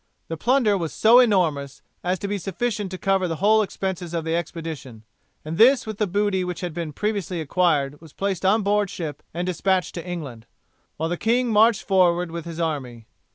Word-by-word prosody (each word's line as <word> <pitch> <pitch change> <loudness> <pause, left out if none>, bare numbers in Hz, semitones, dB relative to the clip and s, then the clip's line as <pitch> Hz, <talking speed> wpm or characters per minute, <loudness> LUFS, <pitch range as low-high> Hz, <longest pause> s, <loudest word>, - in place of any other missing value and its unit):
The 165 - -2
plunder 220 - +2
was 165 -3 -3
so 230 +3 +6
enormous 160 - +1 0.2
as 180 +1 0
to 200 - -5
be 205 0 -2
sufficient 205 +2 -3
to 185 - -6
cover 195 -1 +1
the 165 - -2
whole 215 +6 +4
expenses 190 -4 -4
of 165 -1 -2
the 165 0 0
expedition, 160 -9 -6 0.4
and 160 +2 -5
this 250 +3 +6
with 215 -2 -6
the 210 - +1
booty 200 0 0
which 180 -1 -5
had 175 -3 -4
been 165 -2 -4
previously 200 0 -2
acquired 150 -3 0
was 160 -3 -14
placed 195 0 -3
on 205 +3 +3
board 205 0 +1
ship 155 -6 -6
and 175 +2 -3
despatched 185 0 0
to 170 - -6
England, 145 -11 -7 0.5
while 160 - -1
the 175 - -2
king 240 +4 +1
marched 220 0 +4
forward 180 -2 +2
with 170 -1 -6
his 170 -1 -7
army. 130 -8 -3
180 Hz, 200 wpm, -23 LUFS, 165-205 Hz, 0.5 s, so